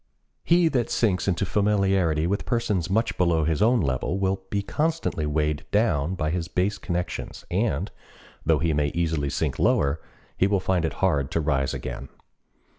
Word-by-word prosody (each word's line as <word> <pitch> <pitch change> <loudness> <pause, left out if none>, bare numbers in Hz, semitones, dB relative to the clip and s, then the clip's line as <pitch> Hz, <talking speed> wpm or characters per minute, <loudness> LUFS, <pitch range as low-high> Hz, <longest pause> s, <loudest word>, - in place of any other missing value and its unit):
He 170 0 +4
that 125 -6 0
sinks 100 -6 +1
into 95 0 +1
familiarity 95 -6 +2
with 100 +4 -1
persons 105 -8 -1
much 110 +4 +1
below 85 -3 +3
his 80 -1 0
own 120 +2 +4
level 70 +5 -1
will 95 0 0
be 100 -1 -1
constantly 155 - -1
weighed 75 0 0
down 90 -6 +1
by 80 -3 -1
his 85 -1 -2
base 100 +3 -1
connections, 90 0 -4
and, 80 +9 0 0.5
though 80 0 +3
he 80 +2 0
may 75 0 +1
easily 80 -4 0
sink - - -2
lower, 70 +3 +2 0.3
he 95 - +2
will 100 -1 +2
find 90 -2 0
it 80 - -2
hard 70 -7 +1
to - - -1
rise 70 -4 0
again. 65 - -6
90 Hz, 170 wpm, -25 LUFS, 75-100 Hz, 0.5 s, He